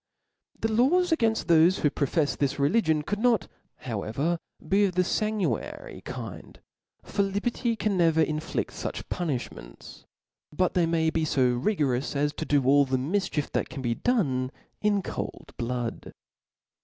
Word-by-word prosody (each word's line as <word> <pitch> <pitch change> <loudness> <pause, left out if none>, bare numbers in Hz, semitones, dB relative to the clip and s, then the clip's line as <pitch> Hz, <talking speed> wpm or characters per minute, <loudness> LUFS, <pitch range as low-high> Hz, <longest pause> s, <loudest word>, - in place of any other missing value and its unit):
The 225 - 0
laws 325 +11 +3
againft 225 -8 +2
thofe 170 +2 +5
who 150 - +3
profefs 145 +1 0
this 140 -2 -1
religion 155 +1 +2
could 205 +6 -3
not 230 -5 +2 0.3
however 130 - -2 0.3
be 200 +1 +4
of 185 -3 -2
the 180 - +4
fanguinary 200 - -2
kind; - - -8 0.4
for 200 - -1
liberty 225 +4 0
can 210 -3 0
never 165 -2 +4
infliA 155 +1 -2
fuch - - -5
punilhmen^: 125 - -5 0.5
but. 185 +4 +1
they 175 -2 +2
tpay 160 -1 +1
be 160 - +1
fo 130 -4 +2
rigorous 140 - 0
as 145 +1 +1
to - - -4
do 145 -2 +2
all 140 +2 +6
the 130 0 0
mifchief 160 +1 -1
that - - -1
can 135 -4 -7
be 120 -1 +1
done 135 - 0 0.3
in 205 -2 +2
cold - - -6
blood. 120 -1 -4
160 Hz, 150 wpm, -27 LUFS, 140-205 Hz, 0.5 s, all